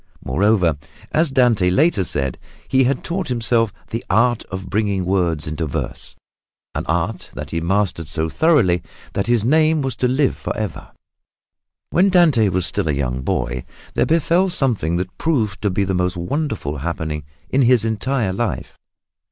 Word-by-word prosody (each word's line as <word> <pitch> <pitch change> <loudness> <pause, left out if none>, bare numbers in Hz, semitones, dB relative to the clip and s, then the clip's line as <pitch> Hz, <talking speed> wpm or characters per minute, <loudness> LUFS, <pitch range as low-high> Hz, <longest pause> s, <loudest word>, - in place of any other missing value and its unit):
Moreover, 90 0 +2 0.3
as 160 0 +2
Dante 120 -9 +3
later 135 - +3
said, 70 -6 -2 0.3
he 135 -1 +3
had 130 +1 0
taught 180 +2 -2
himself 115 -2 +1 0.2
"the 115 - -3
art 115 +4 +3
of 95 0 -6
bringing 100 -3 0
words 85 -5 0
into 75 +1 -3
verse" 70 - -3 0.6
an - - -4
art 90 +4 -1
that - - -6
he 85 - -1
mastered 90 -2 0
so 80 +1 -1
thoroughly 110 - +3 0.3
that 100 - -1
his 120 -3 +2
name 155 +2 +3
was 130 -3 -2
to 125 - +2
live 130 +2 +2
forever. 105 -7 -5 1.0
When 190 +3 +4
Dante 155 - +4
was 90 -1 0
still - - -1
a - - +2
young 65 -2 -2
boy 60 -1 -2 0.3
there - - +1
befell 170 +4 +3
something 115 - +1
that 90 +1 -5
proved 110 -12 0
to 105 - +1
be 100 +2 0
the 95 0 -1
most 90 0 0
wonderful 90 - -2
happening 75 0 -3 0.3
in 135 - +3
his 120 -3 +4
entire 110 -1 0
life. 100 - -3
105 Hz, 160 wpm, -20 LUFS, 85-130 Hz, 1.0 s, When